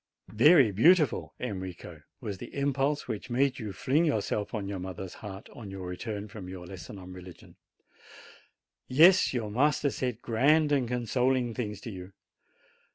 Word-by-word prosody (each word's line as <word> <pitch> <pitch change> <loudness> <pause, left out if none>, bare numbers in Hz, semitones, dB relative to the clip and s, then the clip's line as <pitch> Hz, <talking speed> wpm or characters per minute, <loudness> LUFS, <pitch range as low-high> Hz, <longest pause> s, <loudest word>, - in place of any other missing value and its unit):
Very 135 +1 +6
beautiful, 155 - +3
Enrico, 95 -7 -6 0.2
was 100 -3 -5
the - - -9
impulse 140 +1 0
which 115 +1 -5
made 130 +2 +1
you 110 -4 -5
fling 130 - +1
yourself 105 -8 -1
on 105 -4 -4
your 100 -1 -4
mother's 95 0 -6
heart 100 -2 -8
on 110 -4 -9
your 95 -1 -7
return 100 +3 -5
from 100 -4 -9
your 90 -1 -8
lesson 95 +2 -9
on 90 -1 -10
religion. 90 -1 -12 1.3
Yes, 170 +8 +6
your 115 -5 -3
master 140 +4 +2
said 125 -4 -3
grand 145 +6 +3
and 135 -4 +2
consoling 125 +1 0
things 105 -4 -4
to 115 - -7
you. 95 0 -9
115 Hz, 155 wpm, -29 LUFS, 95-135 Hz, 1.3 s, Very